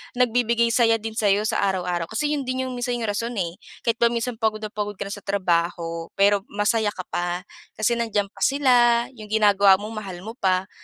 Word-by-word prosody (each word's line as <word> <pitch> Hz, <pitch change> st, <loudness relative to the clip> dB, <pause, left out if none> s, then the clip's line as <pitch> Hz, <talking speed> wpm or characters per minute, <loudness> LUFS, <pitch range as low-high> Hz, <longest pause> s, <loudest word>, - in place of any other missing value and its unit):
nagbibigay 235 Hz, -1 st, +2 dB
saya 230 Hz, -1 st, +4 dB
din 225 Hz, 0 st, -4 dB
sayo 205 Hz, -1 st, +3 dB
sa 215 Hz, -, 0 dB
araw-araw. 180 Hz, -3 st, -1 dB
Kasi 295 Hz, -, -1 dB
yun 285 Hz, -3 st, -2 dB
din 255 Hz, 0 st, -1 dB
yung 260 Hz, -, -4 dB
minsan 245 Hz, 0 st, -1 dB
yung 225 Hz, -3 st, -2 dB
rason 230 Hz, +4 st, -3 dB
eh, 175 Hz, -3 st, -3 dB, 0.2 s
kahit 230 Hz, 0 st, 0 dB
ba 235 Hz, -, +5 dB
minsan 235 Hz, 0 st, -3 dB
pagod 215 Hz, -1 st, 0 dB
na 215 Hz, -, -4 dB
pagod 210 Hz, -1 st, -4 dB
ka -, -, -4 dB
na 200 Hz, -, -7 dB
sa 205 Hz, -, -5 dB
trabaho, 170 Hz, -3 st, -1 dB
pero, 200 Hz, 0 st, +3 dB
masaya 210 Hz, +1 st, 0 dB
ka 185 Hz, -, -5 dB
pa. 175 Hz, +1 st, -2 dB, 0.3 s
Kasi, 225 Hz, +2 st, +1 dB
nandiyan 205 Hz, -3 st, 0 dB
pa -, -, -16 dB
sila, 275 Hz, -2 st, +3 dB, 0.4 s
yung 215 Hz, -, -9 dB
ginagawa 205 Hz, -2 st, +5 dB
mo 210 Hz, -, -5 dB
mahal 200 Hz, -5 st, -7 dB
mo 225 Hz, +5 st, -8 dB
pa. 190 Hz, -1 st, +1 dB
215 Hz, 210 wpm, -23 LUFS, 195-235 Hz, 0.4 s, ba